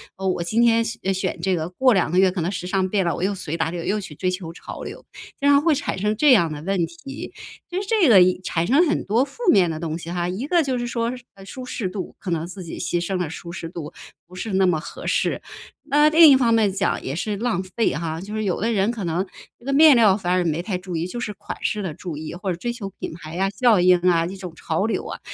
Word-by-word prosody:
哦， 190 Hz, 0 st, -4 dB
我 180 Hz, -2 st, 0 dB
今 175 Hz, +7 st, -1 dB
天 230 Hz, -1 st, +4 dB
选 225 Hz, -4 st, -2 dB
选 190 Hz, -, -3 dB
这 190 Hz, -1 st, +1 dB
个， 160 Hz, 0 st, -3 dB
过 250 Hz, +7 st, +3 dB
2 185 Hz, -4 st, +2 dB
个 180 Hz, -, 0 dB
月 190 Hz, -1 st, +5 dB
可 180 Hz, -2 st, -3 dB
能 175 Hz, -, -1 dB
时 180 Hz, -2 st, -5 dB
尚 185 Hz, 0 st, 0 dB
变 195 Hz, -2 st, +1 dB
了， 170 Hz, -, 0 dB
我 -, -, -6 dB
又 195 Hz, +2 st, 0 dB
随 165 Hz, -3 st, -4 dB
大 160 Hz, -, 0 dB
流 170 Hz, 0 st, -5 dB
又 210 Hz, +4 st, 0 dB
去 155 Hz, -6 st, -9 dB
追 185 Hz, +4 st, -1 dB
求 180 Hz, -3 st, -5 dB
潮 -, -, -9 dB
流， -, -, -8 dB, 0.3 s
经 285 Hz, -, +1 dB
常 285 Hz, 0 st, +6 dB
会 320 Hz, -1 st, +3 dB
产 270 Hz, -8 st, -3 dB
生 210 Hz, +1 st, 0 dB
这 295 Hz, 0 st, +5 dB
样 170 Hz, -9 st, +5 dB
的 150 Hz, 0 st, -6 dB
问 180 Hz, -2 st, 0 dB
题。 270 Hz, -, -9 dB, 0.4 s
就 355 Hz, +2 st, -2 dB
是 395 Hz, -, -6 dB
这 410 Hz, -, +3 dB
个 215 Hz, -, +8 dB, 0.3 s
产 170 Hz, -2 st, -1 dB
生 295 Hz, -, +4 dB
很 -, -, -1 dB
多 225 Hz, +6 st, +2 dB
负 280 Hz, -, -10 dB
面 180 Hz, -4 st, +4 dB
的 155 Hz, -1 st, -4 dB
东 160 Hz, -1 st, -3 dB
西 165 Hz, -, -8 dB
哈， 175 Hz, 0 st, -2 dB
一 200 Hz, +10 st, -4 dB
个 345 Hz, -1 st, +3 dB
就 260 Hz, -3 st, -1 dB
是 240 Hz, -, -3 dB
说 235 Hz, +1 st, -2 dB
是 245 Hz, -, -13 dB, 0.2 s
舒 255 Hz, +6 st, -8 dB
适 240 Hz, -5 st, -3 dB
度， 185 Hz, 0 st, -6 dB
可 180 Hz, -, -6 dB
能 165 Hz, 0 st, -1 dB
自 185 Hz, +1 st, -8 dB
己 170 Hz, -, -7 dB
牺 175 Hz, -, -1 dB
牲 190 Hz, 0 st, -2 dB
了 175 Hz, -4 st, -2 dB
舒 170 Hz, +1 st, -8 dB
适 170 Hz, -2 st, -6 dB
度， 165 Hz, -4 st, -7 dB, 0.3 s
不 180 Hz, -, -19 dB
是 190 Hz, +3 st, -5 dB
那 190 Hz, 0 st, +3 dB
么 175 Hz, -4 st, +2 dB
合 -, -, -9 dB
适。 -, -, 0 dB, 0.4 s
那 295 Hz, +1 st, +4 dB
另 320 Hz, 0 st, +8 dB
一 -, -, +8 dB
方 240 Hz, -3 st, +2 dB
面 215 Hz, -3 st, +3 dB
讲 200 Hz, +1 st, -1 dB
也 135 Hz, -, -4 dB
是 205 Hz, +5 st, -2 dB
浪 225 Hz, -5 st, -1 dB
费 190 Hz, +5 st, -1 dB
哈， 160 Hz, 0 st, -3 dB
就 200 Hz, +4 st, -8 dB
是 215 Hz, 0 st, -2 dB
有 185 Hz, -, -1 dB
的 230 Hz, -, +1 dB
人 195 Hz, +1 st, +2 dB
可 230 Hz, -4 st, -4 dB
能 175 Hz, +2 st, 0 dB, 0.4 s
这 -, -, -22 dB
个 275 Hz, -, -1 dB
面 305 Hz, 0 st, +8 dB
料 215 Hz, -5 st, +5 dB
反 180 Hz, -3 st, -1 dB
而 180 Hz, -1 st, +2 dB
没 165 Hz, 0 st, -1 dB
太 185 Hz, -1 st, -3 dB
注 180 Hz, -1 st, -6 dB
意， 165 Hz, +1 st, -1 dB
就 240 Hz, +7 st, -5 dB
是 210 Hz, -3 st, -4 dB
款 205 Hz, -, -8 dB
式 210 Hz, -1 st, -1 dB
的 170 Hz, -5 st, -4 dB
注 170 Hz, -2 st, -7 dB
意 155 Hz, +1 st, -6 dB
或 190 Hz, +2 st, -5 dB
者 175 Hz, -, -2 dB
追 235 Hz, +7 st, -3 dB
求 205 Hz, -5 st, -6 dB
品 -, -, -5 dB
牌 160 Hz, 0 st, -8 dB
啊， 195 Hz, +1 st, +2 dB
效 215 Hz, -1 st, +3 dB
应 180 Hz, 0 st, +5 dB
啊， 170 Hz, -2 st, +2 dB
这 185 Hz, +3 st, -5 dB
种 180 Hz, -3 st, -8 dB
潮 165 Hz, +6 st, -1 dB
流 225 Hz, -, -2 dB
啊， -, -, -6 dB
190 Hz, 300 characters per minute, -22 LUFS, 175-230 Hz, 0.4 s, 个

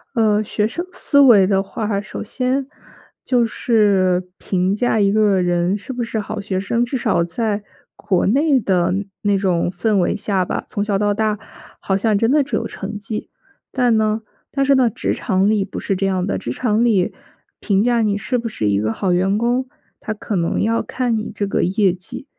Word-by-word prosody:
呃， 215 Hz, -2 st, +3 dB
学 210 Hz, 0 st, -1 dB
生 340 Hz, +11 st, -3 dB
思 285 Hz, -5 st, +1 dB
维 230 Hz, -9 st, +7 dB
的 195 Hz, 0 st, +2 dB
话， 200 Hz, +1 st, -3 dB
首 205 Hz, -, -6 dB
先 260 Hz, +4 st, -1 dB, 0.6 s
就 245 Hz, -2 st, +2 dB
是 200 Hz, -6 st, +2 dB
评 185 Hz, 0 st, 0 dB
价 225 Hz, +1 st, +1 dB
一 200 Hz, -2 st, +3 dB
个 205 Hz, -3 st, +3 dB
人 175 Hz, +2 st, +1 dB
是 230 Hz, +7 st, -8 dB
不 245 Hz, -1 st, -4 dB
是 230 Hz, -1 st, -3 dB
好 215 Hz, +1 st, -5 dB
学 200 Hz, -2 st, -3 dB
生， 235 Hz, +5 st, 0 dB
至 265 Hz, -, -5 dB
少 225 Hz, -8 st, +1 dB
在 205 Hz, +5 st, -1 dB, 0.4 s
国 185 Hz, -3 st, 0 dB
内 280 Hz, +5 st, +3 dB
的 180 Hz, -3 st, +1 dB, 0.3 s
那 205 Hz, -1 st, +2 dB
种 180 Hz, -3 st, +1 dB
氛 195 Hz, +4 st, 0 dB
围 180 Hz, -, +1 dB
下 195 Hz, -3 st, -1 dB
吧， -, -, -3 dB
从 205 Hz, -, -3 dB
小 205 Hz, -1 st, 0 dB
到 205 Hz, 0 st, +1 dB
大 215 Hz, 0 st, 0 dB, 0.4 s
好 190 Hz, -, 0 dB
像 210 Hz, 0 st, +1 dB
真 225 Hz, +4 st, +2 dB
的 300 Hz, -, +4 dB
只 275 Hz, -, -3 dB
有 -, -, -1 dB
成 205 Hz, +1 st, -6 dB
绩。 210 Hz, +1 st, -5 dB, 0.4 s
但 245 Hz, -3 st, +2 dB
呢 215 Hz, 0 st, +1 dB, 0.3 s
但 275 Hz, -1 st, 0 dB
是 275 Hz, -, +4 dB
呢， 255 Hz, -3 st, +4 dB
职 -, -, -2 dB
场 190 Hz, +2 st, +1 dB
里 205 Hz, -3 st, +1 dB
不 -, -, -7 dB
是 195 Hz, -, -1 dB
这 195 Hz, +1 st, 0 dB
样 185 Hz, -1 st, 0 dB
的， 200 Hz, -, -1 dB
职 120 Hz, -, -4 dB
场 225 Hz, -, +1 dB
里 200 Hz, -6 st, +2 dB, 0.5 s
评 200 Hz, -2 st, +1 dB
价 240 Hz, -1 st, +2 dB
你 205 Hz, -2 st, +1 dB
是 245 Hz, +5 st, -1 dB
不 235 Hz, -, -3 dB
是 110 Hz, -, -1 dB
一 100 Hz, 0 st, +2 dB
个 110 Hz, +1 st, -1 dB
好 190 Hz, -, -1 dB
员 190 Hz, +3 st, +2 dB
工， 245 Hz, +3 st, 0 dB, 0.3 s
它 215 Hz, -, -4 dB
可 210 Hz, -2 st, -4 dB
能 170 Hz, -1 st, 0 dB
要 230 Hz, +2 st, +1 dB
看 245 Hz, -3 st, -1 dB
你 215 Hz, -, -4 dB
这 205 Hz, -, -1 dB
个 200 Hz, -, 0 dB
业 195 Hz, +1 st, +2 dB
绩。 180 Hz, +8 st, -8 dB
210 Hz, 220 characters per minute, -19 LUFS, 190-230 Hz, 0.6 s, 维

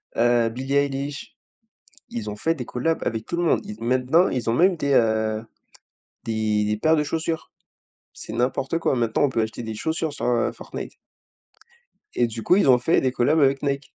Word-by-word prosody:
heu, 120 Hz, -1 st, +3 dB
Billie 130 Hz, +4 st, -3 dB
Eilish, 140 Hz, 0 st, -2 dB, 0.7 s
ils 110 Hz, -3 st, -5 dB
ont 105 Hz, -, -6 dB
fait 165 Hz, +10 st, 0 dB
des 125 Hz, -5 st, -6 dB
collabs 160 Hz, +8 st, -2 dB
avec 110 Hz, -1 st, -2 dB
tout 170 Hz, -, -3 dB
le 175 Hz, -, 0 dB
monde, -, -, +3 dB
ils 105 Hz, -, -8 dB
ont -, -, -6 dB
maintenant 130 Hz, +8 st, +3 dB
ils 125 Hz, -3 st, -2 dB
ont -, -, +1 dB
même 180 Hz, +4 st, +4 dB
des, 140 Hz, -2 st, -1 dB
heu, 110 Hz, -1 st, +1 dB, 0.8 s
des 110 Hz, -2 st, 0 dB
des 105 Hz, 0 st, 0 dB
paires 160 Hz, +8 st, +3 dB
de 150 Hz, -, +2 dB
chaussures. 160 Hz, +1 st, -3 dB, 0.6 s
C'est 110 Hz, -, -9 dB
n'importe 130 Hz, +6 st, 0 dB
quoi, 135 Hz, -, +1 dB
maintenant 115 Hz, +3 st, +1 dB
on 145 Hz, -, +3 dB
peut 115 Hz, -3 st, 0 dB
acheter 110 Hz, +2 st, -4 dB
des 110 Hz, -1 st, -5 dB
chaussures 160 Hz, +4 st, -2 dB
sur, -, -, -5 dB
heu, 120 Hz, -1 st, +1 dB
Fortnite -, -, -8 dB, 1.2 s
et 120 Hz, -, +2 dB
du 115 Hz, 0 st, -6 dB
coup 180 Hz, -, +4 dB
ils 200 Hz, -, +3 dB
ont 125 Hz, -, +6 dB
fait 125 Hz, +7 st, +2 dB
des 130 Hz, -1 st, 0 dB
collabs 150 Hz, +6 st, +2 dB
avec 135 Hz, 0 st, +3 dB
Nike. 140 Hz, -1 st, -3 dB
125 Hz, 200 wpm, -23 LUFS, 115-145 Hz, 1.2 s, ont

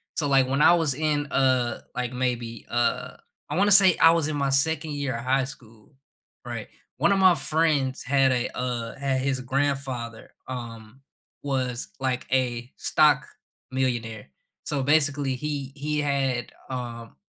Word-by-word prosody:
so, 150 Hz, -, -1 dB
like, 135 Hz, -2 st, +4 dB
when 135 Hz, +3 st, 0 dB
I 170 Hz, -, +7 dB
was 160 Hz, -5 st, +2 dB
in, 150 Hz, 0 st, 0 dB
uh, 130 Hz, -3 st, +1 dB
like, 125 Hz, 0 st, -3 dB
maybe, 120 Hz, -3 st, -3 dB
uh, 120 Hz, 0 st, -1 dB, 0.3 s
I -, -, -2 dB
wanna 205 Hz, +2 st, +3 dB
say 190 Hz, -2 st, +7 dB
I 165 Hz, -, +7 dB
was 165 Hz, -3 st, +1 dB
in 155 Hz, -, -3 dB
my 140 Hz, -1 st, 0 dB
2nd 150 Hz, +3 st, +1 dB
year 140 Hz, -3 st, -3 dB
of 115 Hz, -, -5 dB
high 135 Hz, +1 st, +2 dB
school, 115 Hz, -3 st, -14 dB, 0.5 s
right, 120 Hz, -3 st, -6 dB, 0.3 s
one 170 Hz, +9 st, +3 dB
of 195 Hz, -, +2 dB
my 185 Hz, -2 st, +6 dB
friends 150 Hz, -5 st, +1 dB
had 135 Hz, 0 st, +3 dB
a, 125 Hz, -1 st, -2 dB
uh 120 Hz, -2 st, -3 dB
had 135 Hz, -1 st, -1 dB
his 135 Hz, -1 st, -1 dB
grandfather, 130 Hz, -3 st, -3 dB, 0.2 s
um, 115 Hz, -1 st, -8 dB, 0.4 s
was 130 Hz, -3 st, -2 dB
like 130 Hz, -1 st, -2 dB
a 125 Hz, -2 st, 0 dB
stock -, -, +3 dB, 0.5 s
millionaire, 120 Hz, -, -2 dB, 0.4 s
so 140 Hz, -3 st, -2 dB
basically, 145 Hz, -2 st, +2 dB
he 140 Hz, 0 st, -4 dB
he 150 Hz, +1 st, -2 dB
had, 135 Hz, -4 st, -1 dB, 0.2 s
um 120 Hz, -3 st, -6 dB
130 Hz, 155 wpm, -25 LUFS, 125-145 Hz, 0.5 s, I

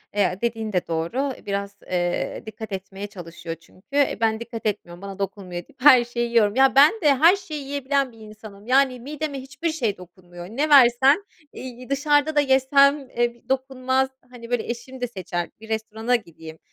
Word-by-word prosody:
Eee, 195 Hz, -2 st, +1 dB
dediğin 225 Hz, -2 st, -2 dB
de 180 Hz, -, 0 dB
doğru. 170 Hz, +13 st, -2 dB
E, -, -, -18 dB
biraz, 200 Hz, 0 st, -3 dB
eee, 175 Hz, -1 st, -2 dB
dikkat 220 Hz, 0 st, -8 dB
etmeye 195 Hz, +1 st, -6 dB
çalışıyor. 170 Hz, -4 st, -8 dB
Çünkü, 165 Hz, +3 st, -23 dB
eee, 285 Hz, -1 st, +2 dB
ben 220 Hz, -1 st, +2 dB
dikkat 235 Hz, -1 st, -8 dB
etmiyorum, 175 Hz, -4 st, -3 dB
bana 200 Hz, 0 st, -8 dB
dokunmuyor, 190 Hz, -3 st, -4 dB
deyip 265 Hz, -, -24 dB
her 260 Hz, -3 st, +8 dB
şeyi 240 Hz, 0 st, -3 dB
yiyorum. 220 Hz, -3 st, +3 dB
Ya, 265 Hz, 0 st, +4 dB
ben 285 Hz, +7 st, +7 dB
de 295 Hz, -4 st, +4 dB
her 330 Hz, +8 st, +6 dB
şeyi 310 Hz, -7 st, -7 dB
yiyebilen 280 Hz, -1 st, -1 dB
bir 225 Hz, -, -19 dB
insanım. 215 Hz, -1 st, -13 dB
Yani, 260 Hz, 0 st, +3 dB
mideme 290 Hz, +2 st, -5 dB
hiçbir 285 Hz, +5 st, -4 dB
şey 235 Hz, -11 st, -1 dB
dokunmuyor. 175 Hz, -1 st, -12 dB
Ne 275 Hz, +10 st, -1 dB
versen, 270 Hz, +6 st, +6 dB, 0.3 s
iii, 250 Hz, 0 st, -9 dB
dışarıda 290 Hz, +2 st, +2 dB
da -, -, +5 dB
yesem, 275 Hz, 0 st, +3 dB
eee, 240 Hz, -1 st, 0 dB
b 235 Hz, -, -27 dB
dokunmaz. 265 Hz, 0 st, 0 dB, 0.2 s
Hani, 235 Hz, -2 st, -11 dB
böyle, 245 Hz, -2 st, 0 dB
eşim 255 Hz, +2 st, -6 dB
de 245 Hz, -, 0 dB
seçer, 180 Hz, -5 st, -4 dB
bir 220 Hz, 0 st, -13 dB
restorana 220 Hz, +2 st, -1 dB
gideyim. 160 Hz, -7 st, -8 dB
235 Hz, 185 wpm, -23 LUFS, 200-270 Hz, 0.3 s, her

